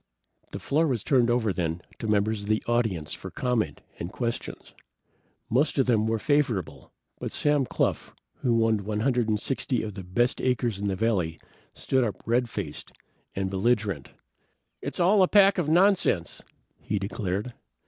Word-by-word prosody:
The - - -5
floor 160 +3 +1
was 120 -7 -1
turned 125 -5 +3
over 115 -4 +1
then 85 -1 -2 0.2
to 110 - -4
members 105 0 +1
of 100 - -7
the 110 0 +1
audience 110 -10 0
for - - -7
comment 125 -3 -1 0.2
and 85 - -5
questions. 115 0 -5 0.7
Most 140 +7 +1
of 135 - +4
them 110 -3 +2
were 115 0 +1
favorable, 125 - -1 0.3
but - - -4
Sam 145 -3 +1
Cluff, - - -1 0.3
who 115 -2 +2
owned 110 -2 0
a 105 0 -1
hundred 125 -3 +1
and 105 -1 +1
sixty 125 0 -1
of 105 -2 -5
the 95 -1 -7
best 120 +8 0
acres 120 -5 0
in 100 - -2
the 95 - 0
valley, 95 -6 0 0.4
stood 130 -1 +1
up 110 -4 -1
red 120 +1 +1
faced 85 -10 -6 0.4
and 95 0 -2
belligerent. 100 - 0 0.7
"It's - - -5
all 190 +4 +5
a 185 - +6
pack 200 -1 +5
of 155 -4 0
nonsense!" 180 - +2 0.4
he 105 - -2
declared. 100 +3 -3
115 Hz, 170 wpm, -26 LUFS, 100-130 Hz, 0.7 s, a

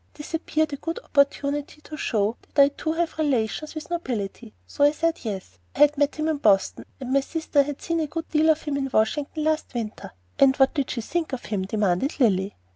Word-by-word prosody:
This 295 +2 -9
appeared 315 -2 0
a - - -3
good 330 +4 -4
opportunity 285 +1 0
to 305 - -9
show 220 -6 0 0.2
that - - +2
I 280 0 +8
too 315 +2 -3
have 330 -1 -2
relations 290 +1 0
with 310 - -4
the 345 +1 -3
nobility, 210 - -5
so 90 - -1
I 290 +1 +6
said 330 +2 -1
yes, 190 - -6 0.2
I - - -8
had 295 0 +6
met 290 0 +1
him 310 0 -1
in 315 -2 +1
Boston, 200 -7 +2
and 260 -1 -4
my 275 - +5
sister 310 0 +1
had 285 0 -4
seen 335 -1 0
a 315 - 0
good 325 +2 -5
deal 315 +1 +3
of 315 0 +3
him 290 -2 -2
in 270 -1 -2
Washington 280 +8 0
last 310 -3 -1
winter. 220 -3 -4 0.3
"'And 270 -1 +6
what 270 -1 +4
did 280 -4 -1
she 235 - -2
think 320 +5 -3
of 260 - -4
him?' 195 -3 -2
demanded 205 - 0
Lilly. 195 -5 +2
285 Hz, 225 wpm, -25 LUFS, 230-310 Hz, 0.3 s, I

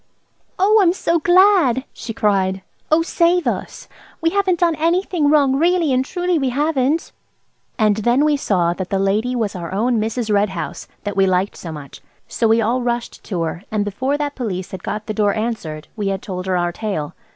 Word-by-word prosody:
"Oh, 420 +4 +4
I'm 350 -3 +4
so 340 -2 0
glad!" 350 - +4
she 230 - -7
cried; 195 -5 0 0.3
"oh, 315 +2 +4
save 345 +1 +2
us! - - -4 0.3
We 330 0 +1
haven't 375 -3 +1
done 340 -1 +4
anything 335 -1 +1
wrong, 285 -3 +4
really 335 -2 +2
and 255 +1 +2
truly 355 +3 -1
we 270 -2 0
haven't." 290 +2 0 0.7
And 215 -3 +3
then 240 +6 +2
we 305 - +3
all - - +1
saw 175 -7 +1
that 185 0 -5
the 195 - 0
lady 210 +6 0
was 220 -5 -1
our 170 -2 -6
own 230 +4 +1
Mrs. 220 0 -1
Red 205 0 +3
House, 180 -3 -6 0.2
that 205 -1 -4
we 195 -1 +3
liked 185 +2 0
so 165 - -7
much. 145 -3 -10 0.3
So 230 - 0
we 225 +1 +4
all 235 +4 +1
rushed 240 -1 -3
to 175 -5 -2
her, 165 +2 -4
and 210 -1 -1
before 260 +8 -1
that 290 -1 -2
Police 190 -9 -4
had 190 - -7
got 210 +3 -4
the 215 - -3
door 205 -2 +1
answered 205 -10 -4
we 210 -3 -2
had 195 -1 -2
told 185 -1 -5
her 185 -1 +1
our 175 0 0
tale. 175 -6 -4
230 Hz, 205 wpm, -19 LUFS, 195-305 Hz, 0.7 s, Oh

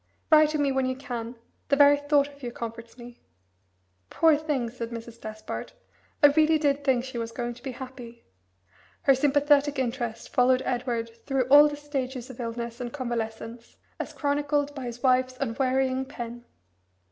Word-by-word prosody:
Write 310 -1 +7
to 305 - -1
me 285 -2 +1
when 265 -1 0
you 260 - -1
can. 245 -3 -6 0.3
The 280 - +4
very 285 0 +6
thought 290 0 +2
of 285 0 -16
you 245 -2 -5
comforts 230 0 -8
me." 240 0 -12 0.9
"Poor 325 -2 +4
thing," 290 -6 -2
said 235 -1 -6
Mrs. 230 0 -9
Despard, 215 0 -7 0.5
"I - - +11
really 315 0 +4
did 285 -2 0
think 260 -3 +2
she 260 -2 -5
was 230 0 -4
going 240 0 -4
to 245 - -16
be 265 0 -5
happy." 245 -2 -10 0.8
Her 275 - +6
sympathetic 290 +1 +3
interest 240 -3 -3
followed 255 +1 +3
Edward 240 -2 -2 0.2
through 270 -2 +1
all 290 +2 +9
the 295 0 -5
stages 265 -3 -4
of 255 - -14
illness 235 0 -5
and 240 -1 -4
convalescence, 235 -2 -5 0.2
as - - -4
chronicled 290 0 0
by 270 -3 -6
his 240 +1 -7
wife's 255 0 +2
unwearying 260 +1 0
pen. 240 -3 -8
255 Hz, 170 wpm, -26 LUFS, 235-285 Hz, 0.9 s, I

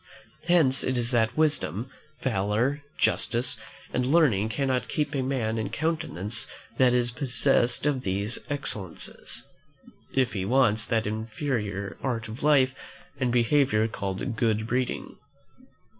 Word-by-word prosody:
Hence 155 -7 +4
it 130 -1 0
is 120 0 0
that 115 +1 +2
wisdom, 145 - +1 0.4
valour, 115 +5 +1 0.2
justice, 120 +2 +1 0.3
and 125 - +1
learning 125 - +3
cannot 130 0 0
keep 150 -1 -1
a 135 - 0
man 120 -4 -1
in 110 - -2
countenance 150 - -2 0.3
that 130 -1 +6
is 120 -1 +2
possessed 130 -1 +1
of 145 -3 +1
these 100 +2 -1
excellences, 110 - -4 0.7
if 130 -3 +1
he 95 -3 -2
wants 110 -1 +2
that 115 -1 +1
inferior 110 -2 -3
art 115 -4 -2
of 110 +3 -8
life 140 -3 +4 0.5
and 125 -2 +1
behaviour 120 -2 +3
called 100 0 -3
good 110 -2 +1
breeding. 125 +2 -2
120 Hz, 130 wpm, -27 LUFS, 110-135 Hz, 0.7 s, that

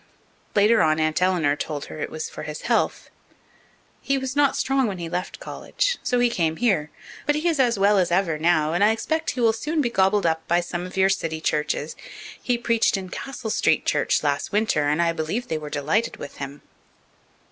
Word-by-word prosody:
Later 215 +2 +5
on 155 0 +3
Aunt 155 +2 0
Eleanor 175 -6 +2
told 145 -1 -4
her - - -9
it - - -3
was 460 0 -5
for 470 - -9
his - - -6
health. - - 0 0.9
"He 275 - 0
was 265 0 -4
not 285 -1 +3
strong 270 -2 +1
when 195 -3 -4
he 170 -1 -5
left 180 +2 -4
college, - - -2
so 250 - 0
he 245 0 +4
came 165 -8 0
here. 175 -9 +1 0.4
But 295 - +3
he 305 +3 -1
is 325 -4 +1
as 240 -4 +3
well 200 +1 +4
as 180 - +2
ever 170 -4 +1
now, 160 -1 +2
and 175 +4 +2
I 210 - +6
expect 320 +8 -2
he 250 - -2
will 225 -1 +4
soon 305 +8 -2
be 245 -5 +1
gobbled 195 -1 +2
up 160 -1 0
by 175 +1 +3
some 175 0 -4
of 185 - -11
your 190 0 +4
city 165 -5 -1
churches. 150 -1 -1 0.5
He 245 -1 0
preached 230 -2 +2
in 190 -1 -6
Castle 245 0 -5
Street 160 - +2
church - - +1
last 145 -1 -1
winter, 205 -8 +1
and 155 +3 +2
I 170 - +2
believe 165 +9 -3
they 160 - -1
were 150 -1 -7
delighted 155 +11 -1
with - - -9
him." 140 +1 -7
190 Hz, 210 wpm, -24 LUFS, 160-240 Hz, 0.9 s, I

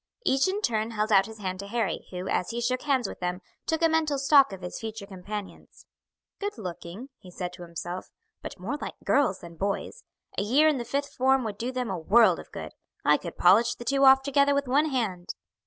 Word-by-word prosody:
Each 270 +6 +3
in 400 +3 -2
turn 220 - 0
held 215 -1 -2
out 195 -1 +5
his 220 0 -10
hand 185 -3 -4
to 200 - -6
Harry, 225 0 -2
who, 180 0 -6
as 180 - 0
he 235 - -3
shook 250 +2 0
hands 265 -6 +1
with - - -8
them, 180 0 -2 0.3
took 320 +1 0
a - - +7
mental 315 -3 +1
stock 275 -1 +5
of 190 -1 -8
his 180 - -5
future 220 -2 -6
companions. 195 +1 -8 0.5
"Good 410 -5 -4
looking," 185 +4 -7
he 185 - -14
said 180 0 -5
to - - -12
himself, 175 +1 -6 0.3
"but - - -7
more 225 +11 -3
like - - -5
girls 245 -10 +2
than 170 -1 -11
boys. 200 - -3 0.4
A - - +1
year 265 +10 +4
in 300 -4 +2
the 240 - -4
fifth 280 +4 -3
form 265 0 +3
would 210 -3 -5
do 245 +2 -2
them 250 -4 -3
a 185 - -3
world 220 +8 +5
of - - -12
good. - - -7 0.3
I - - +5
could - - -8
polish 205 +7 +5
the 240 - -10
two 275 +3 +2
off 265 0 +7
together 280 0 +3
with 280 -1 0
one 280 +5 +3
hand." 205 -10 -2
230 Hz, 225 wpm, -27 LUFS, 190-275 Hz, 0.5 s, a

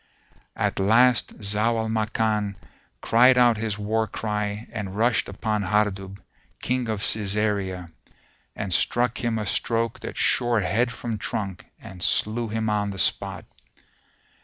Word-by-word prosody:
At - - -1
last 115 +4 +3
Zau 105 +3 +2
al 110 0 -1
Makan 110 -2 -1 0.5
cried 125 +2 +5
out 120 -3 +5
his 110 -1 -2
war 110 +2 -1
cry 105 0 -3
and 100 -4 -5
rushed 115 +1 +2
upon 110 -2 -2
Hardub, 100 -1 -1 0.4
King 125 -2 -1
of 105 -2 -2
Cæsarea,[FN#452] 100 -4 -1 0.6
and 100 -3 -3
struck 120 +7 +1
him 115 -1 0
a 105 - -3
stroke 115 +2 -1
that - - -7
shore 120 -2 +2
head 115 +7 +1
from 115 -3 -5
trunk 100 -3 -4
and 95 -5 -11
slew 115 +6 +1
him 110 +1 -2
on 105 -1 0
the 100 - -6
spot. 90 - -1
110 Hz, 135 wpm, -24 LUFS, 100-115 Hz, 0.6 s, cried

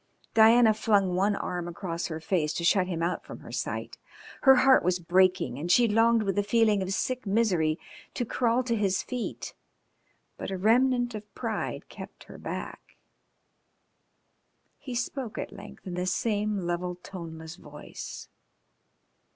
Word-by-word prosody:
Diana 225 0 +6
flung 205 -4 +2
one 200 +3 +2
arm 175 -3 -3
across 175 -1 -4
her 160 -1 -5
face 160 -2 0
to 170 - -3
shut 180 +1 +3
him 165 -3 -2
out 175 +1 -1
from - - -10
her - - -11
sight. - - -4 0.4
Her 265 -1 +8
heart 265 +1 +5
was 180 +1 +2
breaking, 175 -7 +2
and 170 +4 -1
she 240 +5 +5
longed 225 +1 +3
with 200 0 0
a - - +2
feeling 215 -1 +3
of 190 0 -3
sick 255 +4 -2
misery 185 -7 +2 0.4
to 245 - -1
crawl 240 +2 +1
to 235 -2 0
his 195 -3 0
feet, 250 -2 -5 0.9
but - - -4
a 190 - -3
remnant 245 +4 +3
of 210 -1 -8
pride - - -4
kept - - -11
her - - -12
back. - - -7 1.8
He 255 -4 -7
spoke 250 -1 -3
at - - -5
length - - -12
in 185 - -5
the 180 +1 -2
same 205 -1 -1
level, 175 +1 -2
toneless 165 -3 -9
voice. 150 -4 -9
200 Hz, 155 wpm, -28 LUFS, 175-230 Hz, 1.8 s, Her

